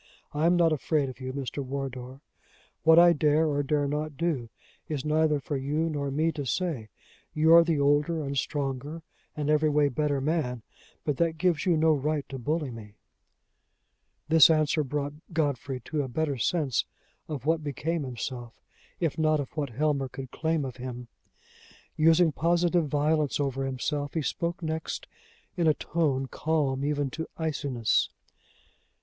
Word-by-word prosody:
I 150 Hz, +3 st, +2 dB
am 175 Hz, -, +4 dB
not 170 Hz, -2 st, +4 dB
afraid 150 Hz, -1 st, 0 dB
of 130 Hz, -1 st, -10 dB
you, 130 Hz, 0 st, -4 dB
Mr. 140 Hz, +1 st, -4 dB
Wardour. 130 Hz, -1 st, -6 dB, 0.6 s
What 160 Hz, 0 st, +6 dB
I 175 Hz, 0 st, +8 dB
dare 155 Hz, +1 st, +3 dB
or 145 Hz, -1 st, +1 dB
dare 145 Hz, 0 st, 0 dB
not 150 Hz, 0 st, -3 dB
do, 155 Hz, -9 st, -1 dB, 0.4 s
is 150 Hz, -3 st, -3 dB
neither 155 Hz, -1 st, +2 dB
for 145 Hz, +1 st, -4 dB
you 150 Hz, +5 st, -1 dB
nor 140 Hz, -2 st, -2 dB
me 155 Hz, +4 st, +1 dB
to 145 Hz, -, -5 dB
say. 135 Hz, -6 st, -2 dB, 0.5 s
You 160 Hz, +1 st, +5 dB
are 170 Hz, 0 st, +9 dB
the 165 Hz, -3 st, 0 dB
older 145 Hz, +3 st, +2 dB
and 140 Hz, 0 st, -3 dB
stronger 140 Hz, +3 st, -3 dB, 0.3 s
and 150 Hz, -1 st, -2 dB
every 150 Hz, 0 st, +3 dB
way 145 Hz, -1 st, +3 dB
better 145 Hz, +1 st, 0 dB
man, 135 Hz, -5 st, -1 dB, 0.4 s
but 145 Hz, -3 st, -1 dB
that 165 Hz, -1 st, +1 dB
gives 175 Hz, 0 st, +1 dB
you 170 Hz, -3 st, +4 dB
no 160 Hz, 0 st, +4 dB
right 150 Hz, 0 st, -1 dB
to 135 Hz, -, -6 dB
bully 150 Hz, +2 st, -1 dB
me." 105 Hz, -3 st, -10 dB, 1.3 s
This 160 Hz, 0 st, +7 dB
answer 155 Hz, -1 st, +2 dB
brought 145 Hz, +1 st, -3 dB, 0.2 s
Godfrey 140 Hz, -4 st, -1 dB
to 150 Hz, +5 st, -2 dB
a 135 Hz, -, -3 dB
better 140 Hz, +1 st, -2 dB
sense 145 Hz, -3 st, +1 dB, 0.4 s
of 145 Hz, -4 st, -5 dB
what 160 Hz, 0 st, +1 dB
became 155 Hz, +3 st, -2 dB
himself, 125 Hz, -2 st, -6 dB, 0.4 s
if 165 Hz, -2 st, -1 dB
not 155 Hz, -1 st, +3 dB
of 140 Hz, -, -6 dB
what 145 Hz, -3 st, -2 dB
Helmer 140 Hz, +1 st, 0 dB
could 130 Hz, -1 st, -8 dB
claim 160 Hz, -2 st, -1 dB
of 130 Hz, -1 st, -7 dB
him. 125 Hz, -1 st, -7 dB, 0.9 s
Using 165 Hz, +1 st, +5 dB
positive 170 Hz, +2 st, +2 dB
violence 150 Hz, 0 st, +1 dB
over 135 Hz, -1 st, -1 dB
himself, 145 Hz, +3 st, -3 dB
he 160 Hz, -, 0 dB
spoke 170 Hz, +4 st, -2 dB
next 160 Hz, 0 st, -3 dB, 0.5 s
in 170 Hz, -2 st, +1 dB
a 155 Hz, -, +4 dB
tone 145 Hz, -5 st, 0 dB
calm 140 Hz, -2 st, -1 dB
even 145 Hz, -2 st, 0 dB
to 160 Hz, +3 st, -5 dB
iciness. 140 Hz, -8 st, 0 dB
150 Hz, 165 wpm, -28 LUFS, 135-160 Hz, 1.3 s, are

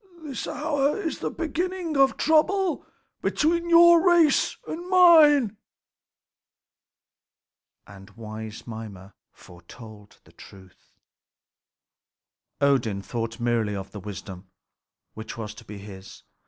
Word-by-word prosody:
This 280 Hz, -5 st, -6 dB
hour 295 Hz, +1 st, -1 dB
is 335 Hz, -6 st, -4 dB
the -, -, -3 dB
beginning 345 Hz, 0 st, -4 dB
of 270 Hz, -1 st, +3 dB
trouble 350 Hz, +3 st, +1 dB, 0.3 s
between 340 Hz, +2 st, 0 dB
your 340 Hz, 0 st, +7 dB
race 340 Hz, -5 st, +3 dB
and 345 Hz, +3 st, -7 dB
mine." 305 Hz, -, +5 dB, 2.3 s
And 95 Hz, -1 st, -14 dB
wise 110 Hz, -1 st, -9 dB
Mimer 105 Hz, -4 st, -10 dB, 0.2 s
foretold 105 Hz, +4 st, -15 dB
the -, -, -22 dB
truth. 95 Hz, -2 st, -17 dB, 1.7 s
Odin 120 Hz, -8 st, +1 dB
thought 115 Hz, +1 st, -5 dB
merely 115 Hz, -3 st, -1 dB
of 95 Hz, 0 st, -7 dB
the 105 Hz, -, -8 dB
wisdom 95 Hz, -2 st, -9 dB, 0.6 s
which 110 Hz, +1 st, -9 dB
was 110 Hz, -2 st, -6 dB
to 105 Hz, -, -15 dB
be 105 Hz, -, -10 dB
his. 100 Hz, -1 st, -12 dB
120 Hz, 105 wpm, -24 LUFS, -, 2.3 s, your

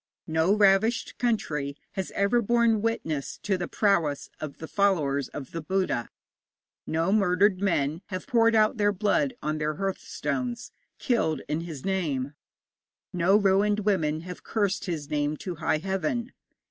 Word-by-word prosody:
No 160 Hz, +5 st, +2 dB
ravished 210 Hz, +3 st, +3 dB
country 150 Hz, -, -1 dB
has 190 Hz, -, -4 dB
ever 200 Hz, +5 st, +3 dB
borne 235 Hz, -1 st, +3 dB
witness 160 Hz, -11 st, -2 dB
to 205 Hz, -2 st, +1 dB
the 180 Hz, -1 st, -3 dB
prowess 170 Hz, -9 st, +1 dB
of 150 Hz, -2 st, -6 dB
the 160 Hz, -, -7 dB
followers 150 Hz, -10 st, +1 dB
of 135 Hz, -3 st, -8 dB
the 165 Hz, -, -4 dB
Buddha; 185 Hz, -8 st, -1 dB, 0.8 s
no 165 Hz, +4 st, +1 dB
murdered 195 Hz, -1 st, +3 dB
men 160 Hz, -4 st, 0 dB
have 185 Hz, -2 st, -5 dB
poured 230 Hz, -1 st, +3 dB
out 215 Hz, +1 st, +3 dB
their 205 Hz, -1 st, +3 dB
blood 210 Hz, +7 st, +1 dB
on 155 Hz, 0 st, -1 dB
their 150 Hz, 0 st, -1 dB
hearthstones, 240 Hz, -, -3 dB, 0.3 s
killed 160 Hz, -, 0 dB
in 150 Hz, +3 st, -1 dB
his 160 Hz, -6 st, -7 dB
name; 150 Hz, -8 st, -1 dB, 0.8 s
no 180 Hz, +3 st, +4 dB
ruined 205 Hz, +1 st, +3 dB
women 160 Hz, -7 st, +1 dB
have 180 Hz, +1 st, -9 dB
cursed 205 Hz, -3 st, -1 dB
his 160 Hz, -6 st, -3 dB
name 150 Hz, 0 st, 0 dB
to 180 Hz, 0 st, -6 dB
high 155 Hz, 0 st, +1 dB
Heaven. 210 Hz, -, -2 dB
190 Hz, 145 wpm, -27 LUFS, 155-210 Hz, 0.8 s, no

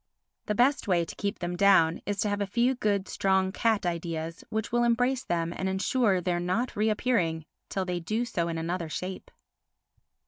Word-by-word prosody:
The 210 Hz, -, 0 dB
best 255 Hz, +2 st, +2 dB
way 175 Hz, -3 st, +2 dB
to -, -, -9 dB
keep 200 Hz, 0 st, -2 dB
them 175 Hz, 0 st, -3 dB
down 175 Hz, -4 st, +4 dB
is 205 Hz, -1 st, -2 dB
to 210 Hz, -, +1 dB
have 205 Hz, 0 st, -1 dB
a 200 Hz, -, 0 dB
few 240 Hz, +6 st, +2 dB
good 205 Hz, -5 st, 0 dB
strong 190 Hz, -1 st, +1 dB
cat 220 Hz, -1 st, +1 dB
ideas 165 Hz, -1 st, -3 dB
which 220 Hz, -1 st, -3 dB
will 240 Hz, 0 st, +2 dB
embrace 245 Hz, +2 st, +2 dB
them 170 Hz, 0 st, -1 dB
and 190 Hz, -, -2 dB
ensure 195 Hz, +1 st, +2 dB
their 175 Hz, -1 st, -1 dB
not 185 Hz, +8 st, -1 dB
reappearing 210 Hz, -7 st, +1 dB, 0.2 s
till 190 Hz, -1 st, -2 dB
they 180 Hz, -1 st, -2 dB
do 215 Hz, +8 st, -1 dB
so 175 Hz, -8 st, -1 dB
in 165 Hz, -1 st, -3 dB
another 165 Hz, 0 st, -3 dB
shape. 185 Hz, +4 st, -5 dB
190 Hz, 185 wpm, -28 LUFS, 175-220 Hz, 0.2 s, down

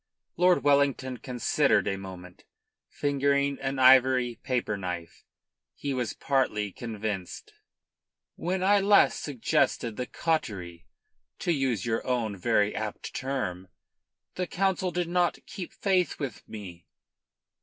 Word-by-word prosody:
Lord 180 Hz, +1 st, +4 dB
Wellington 140 Hz, -3 st, +2 dB
considered 125 Hz, +1 st, +1 dB
a 95 Hz, -, 0 dB
moment, 90 Hz, -2 st, -10 dB, 0.5 s
fingering 140 Hz, 0 st, +1 dB
an 135 Hz, 0 st, -2 dB
ivory 130 Hz, -2 st, +5 dB
paper 120 Hz, -5 st, -1 dB
knife. 90 Hz, -3 st, -6 dB, 0.5 s
He 140 Hz, -1 st, -3 dB
was 125 Hz, -3 st, -2 dB
partly 105 Hz, -7 st, 0 dB
convinced. 105 Hz, -3 st, -5 dB, 0.8 s
"When 185 Hz, +2 st, -2 dB
I 200 Hz, +1 st, +5 dB
last 200 Hz, +1 st, +4 dB
suggested 120 Hz, -4 st, 0 dB
the 125 Hz, -, -3 dB
cautery, 95 Hz, -, -2 dB, 0.5 s
to 175 Hz, -, -1 dB
use 130 Hz, -, 0 dB
your 115 Hz, -1 st, -1 dB
own 120 Hz, -5 st, 0 dB
very 105 Hz, +1 st, +1 dB
apt 110 Hz, -1 st, -5 dB
figure, 95 Hz, -10 st, -3 dB, 0.6 s
the 180 Hz, -1 st, -3 dB
Council 190 Hz, -1 st, 0 dB
did 175 Hz, -1 st, -2 dB
not 175 Hz, 0 st, +1 dB
keep 180 Hz, -3 st, -7 dB
faith 185 Hz, -3 st, +1 dB
with 135 Hz, -7 st, -6 dB
me." 90 Hz, -6 st, -9 dB
130 Hz, 120 wpm, -28 LUFS, 105-145 Hz, 0.8 s, ivory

